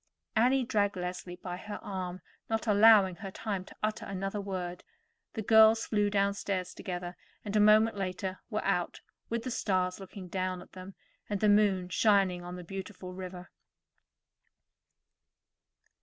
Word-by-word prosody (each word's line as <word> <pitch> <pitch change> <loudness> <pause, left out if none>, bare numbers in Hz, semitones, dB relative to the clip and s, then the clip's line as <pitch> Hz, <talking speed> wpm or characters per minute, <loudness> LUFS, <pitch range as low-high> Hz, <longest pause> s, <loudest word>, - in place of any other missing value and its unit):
Annie 255 +4 +4
dragged 205 -4 +1
Leslie 180 0 -5
by 180 0 -6
her 210 +2 -7
arm, 185 -2 -5 0.3
not 225 0 -1
allowing 205 -4 +6
her 195 - -6
time 195 -1 -4
to - - -14
utter 215 0 -1
another 195 +1 -3
word. 180 -3 -5 0.5
The 220 - -4
girls 220 +1 +6
flew 205 -2 +1
downstairs 200 -2 -1
together, 175 -1 -5 0.3
and 205 0 -4
a - - +5
moment 215 +1 +5
later 190 0 -3
were 215 -2 -2
out, 180 -3 -1 0.3
with 230 0 -2
the 255 - -4
stars 185 -5 0
looking 190 -1 -9
down 185 0 -2
at - - -14
them, 185 +1 -10 0.3
and 205 -1 -1
the 210 - +3
moon 205 -3 +3
shining 190 -2 +3
on 175 0 -7
the 180 - -8
beautiful 185 0 -7
river. 180 -1 -8
195 Hz, 150 wpm, -30 LUFS, 185-210 Hz, 0.5 s, allowing